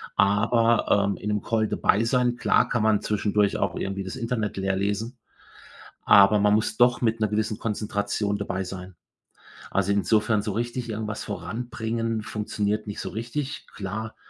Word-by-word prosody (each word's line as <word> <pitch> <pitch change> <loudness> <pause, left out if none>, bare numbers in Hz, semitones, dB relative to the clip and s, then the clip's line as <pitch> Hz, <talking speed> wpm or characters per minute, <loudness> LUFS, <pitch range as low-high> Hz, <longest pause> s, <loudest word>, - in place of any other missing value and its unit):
aber, 110 +1 +3
ähm, 100 - -2
in - - -7
'nem 105 -1 0
Call 110 -1 0
dabei 105 - +2
sein 125 0 +1
klar, - - +2
kann 115 -3 0
man 110 -1 +3
zwischendurch 105 -1 +1
auch - - -1
irgendwie 95 0 -3
das 95 - -6
Internet 115 -3 -2
leerlesen, 100 +5 -1 0.9
aber 100 +1 +7
man 105 0 +4
muss 110 0 0
doch 120 +1 +4
mit 115 -1 +1
'ner 110 - +2
gewissen 105 +1 -1
Konzentration 105 -1 -2
dabei 95 -2 -3
sein. 90 0 -8 0.8
Also, 100 0 +1
insofern 105 +1 +2
so 105 - -2
richtig 120 +2 -3
irgendwas 110 -1 -4
voranbringen 115 -1 -3
funktioniert 105 0 -2
nicht 105 - -5
so - - -4
richtig. 125 +6 -4
Klar, 110 +3 -5
105 Hz, 155 wpm, -25 LUFS, 100-115 Hz, 0.9 s, aber